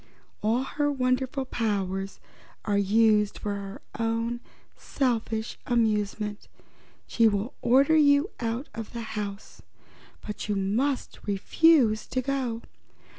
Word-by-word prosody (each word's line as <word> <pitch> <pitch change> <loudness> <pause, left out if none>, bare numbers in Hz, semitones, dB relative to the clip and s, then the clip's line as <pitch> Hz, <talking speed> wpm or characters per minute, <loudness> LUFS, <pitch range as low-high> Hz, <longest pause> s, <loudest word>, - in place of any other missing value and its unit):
All 225 +5 +1
her 290 +2 -1
wonderful 260 0 0
powers 195 -5 -2 0.5
are 205 - +1
used 210 +1 +3
for 205 - -3
her 200 0 -7 0.2
own 230 +1 -1 0.4
selfish 230 -4 -2
amusement. 210 -3 0 0.6
She 230 -1 +3
will 205 +3 -1
order 275 +6 +4
you 290 +3 +4
out 235 +4 -2
of 225 +1 -7
the 235 - -4
house 205 -1 -6 0.6
but 210 0 -6
you 205 - +1
must 230 +8 -1
refuse 220 +3 +3
to 255 - -1
go. 255 -4 -2
225 Hz, 115 wpm, -27 LUFS, 210-255 Hz, 0.6 s, order